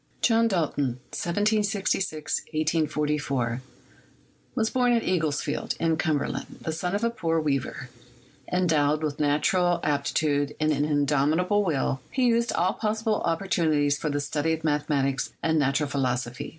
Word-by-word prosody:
John 230 -1 +4
Dalton 145 - 0 0.2
(1766 200 -4 0
1844) 150 -5 0 0.9
was 225 -3 +1
born 245 -1 +3
at 230 - +2
Eaglesfield, 160 -5 -1
in 165 -1 +1
Cumberland, 155 -3 -2
the 160 - -3
son 180 +4 -2
of 205 - -2
a 235 - +2
poor 165 -7 0
weaver; 135 -4 -2 0.6
endowed 155 -4 +2
with 150 -2 -2
nat 145 0 +1
ural 175 -2 +2
aptitude 145 0 0
and 155 0 +2
an 145 0 +1
indomitable 150 +7 +2
will, 135 -6 0
he 260 - 0
utilized 235 -1 +2
all 180 +2 +1
pos 220 0 -2
sible 220 -2 +1
opportunities 160 -5 +1
for 155 - -2
the 145 0 -1
study 150 +2 -1
of 160 0 -4
mathematics 145 -3 0
and 160 -1 +2
natu 140 +2 +1
ral 150 - -1
philosophy. 125 -3 -2
155 Hz, 145 wpm, -26 LUFS, 145-185 Hz, 0.9 s, John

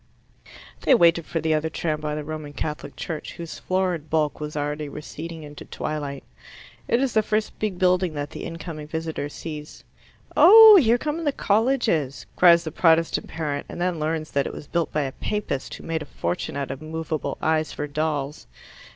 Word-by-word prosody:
They 265 - +5
waited 170 -5 +4
for 165 - -2
the 160 0 +1
other 155 +1 0
tram 155 -1 -2
by 150 0 -2
the 150 - -4
Roman 155 -1 -6
Catholic 150 -1 -5
Church, 160 -3 -5
whose 170 -1 -8
florid 180 -5 -1
bulk 150 -3 0
was 150 0 -5
already 150 0 -2
receding 160 +2 -8
into 145 0 -10
twilight. 145 -3 -5 0.6
It 235 - +2
is 265 -2 0
the 220 - +4
first 215 0 -2
big 210 -4 -2
building 180 -2 +2
that 145 0 -4
the - - -7
incoming 165 -2 -7
visitor 160 -2 -4
sees. 150 -5 -8 0.5
"Oh, 430 +6 +10
here 235 -1 +4
come 305 +5 -3
the 290 - +2
colleges!" 215 - +1
cries 170 -1 +6
the 160 - -5
Protestant 165 0 +2
parent, 150 -3 -4
and - - -7
then 175 -2 0
learns 155 0 -2
that 140 -1 +1
it - - -6
was - - -8
built 170 +2 -1
by 150 - 0
a 135 - -3
Papist 210 -6 -3
who - - -12
made 165 -1 -2
a - - -6
fortune 90 +1 -3
out 140 -1 -3
of 135 +1 -7
movable 155 -2 -4
eyes 155 0 +1
for 145 - -4
dolls. 150 -1 -3
160 Hz, 185 wpm, -24 LUFS, 150-175 Hz, 0.6 s, Oh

